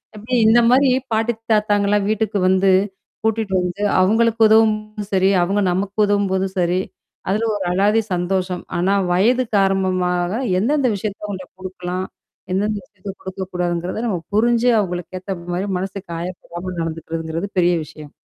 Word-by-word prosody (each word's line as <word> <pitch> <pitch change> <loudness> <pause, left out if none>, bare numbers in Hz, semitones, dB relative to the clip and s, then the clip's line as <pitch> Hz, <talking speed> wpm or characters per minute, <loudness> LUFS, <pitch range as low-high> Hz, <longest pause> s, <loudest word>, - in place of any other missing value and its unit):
அப்படி 225 +4 -3
இந்த 235 +2 +6
மாரி, 265 +1 +5 0.2
பாட்டி 225 +2 +1 0.2
தாத்தாங்கலாம் 205 -1 +2
வீட்டுக்கு 215 -1 0
வந்து 190 0 +4 0.5
கூட்டிட்டு 220 -3 0
வந்து, 180 +3 -4 0.2
அவங்களுக்கு 225 +3 +2
உதவும்போதும் 215 -1 +2
சரி, 190 0 +4
அவங்க 200 +3 0
நமக்கு 195 +3 -2
உதவும்போதும் 195 -2 0
சரி, 180 +1 +1 0.5
அதுல 215 +4 +1
ஒரு 195 - -3
அலாதி 210 +4 +3
சந்தோஷம். 180 0 -1 0.2
ஆனா 190 +3 +2 0.2
வயது 240 +8 +3
காரணமாக 185 -2 +1 0.3
எந்தெந்த 275 +4 +1
விஷயத்த 205 +1 -5
அவுங்கள்ட்ட 190 -3 -6
குடுக்கலாம்? 185 0 -4 0.5
எந்தெந்த 210 +2 0
விஷயத்த 205 -8 -9
குடுக்கக்கூடாதுங்கிறத 180 +1 -3
நம்ம 185 -6 -1 0.2
புரிஞ்சு 235 +2 +3
அவங்களுக்கு 180 -1 -3
ஏத்த 190 +1 -5 0.2
மாரி 190 +3 -2
மனசுக்கு 190 0 -6
காயப்படாம 175 +1 -6
நடந்துக்கிறதுங்கிறது 165 +2 -4
பெரிய 175 0 +3
விஷயம். 150 -1 -12
195 Hz, 130 wpm, -20 LUFS, 180-215 Hz, 0.5 s, இந்த